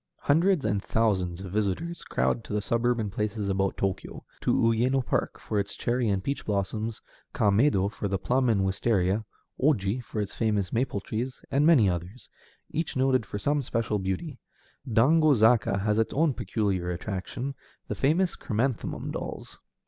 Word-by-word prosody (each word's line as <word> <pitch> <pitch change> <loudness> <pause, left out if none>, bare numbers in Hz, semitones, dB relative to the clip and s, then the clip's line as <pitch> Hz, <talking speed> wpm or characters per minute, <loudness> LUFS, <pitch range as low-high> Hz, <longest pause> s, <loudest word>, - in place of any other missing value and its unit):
Hundreds 165 +2 +3
and 100 -2 +1
thousands 95 -6 0
of 95 -2 -7
visitors 110 - -2
crowd 115 - 0
to - - -7
the 105 - +1
suburban 115 0 0
places 105 0 -2
about 95 0 0
Tōkyō, 95 -1 -3 0.2
to - - 0
Uyéno 120 +3 +2
Park - - -1
for 105 - -2
its 100 0 -3
cherry 120 -1 0
and 95 -2 0
peach 140 +5 -2
blossoms, 105 +2 -2 0.3
Kaméido 100 -1 +3
for 105 - -4
the 95 0 0
plum 125 +6 +1
and 105 -4 +3
wistaria, 100 +1 +1 0.4
Oji 125 -4 +1
for 110 - -5
its 100 -1 -3
famous 105 -5 0
maple 120 -4 0
trees, 120 +6 -4
and 140 +3 +3
many 140 -12 +6
others, 90 +6 -4 0.4
each 160 -3 -2
noted 130 -4 +2
for - - -4
some 145 +8 +1
special 115 -4 -1
beauty. 95 - -3 0.5
Dango 150 +6 +5
Zaka 110 -3 +3
has 105 +1 +1
its 110 - 0
own 155 0 +3
peculiar 100 -7 -1
attraction, 100 +8 -4 0.3
the - - -2
famous 170 +6 +1
chrysanthemum 120 +2 -2
dolls. - - -6
110 Hz, 160 wpm, -27 LUFS, 100-130 Hz, 0.5 s, many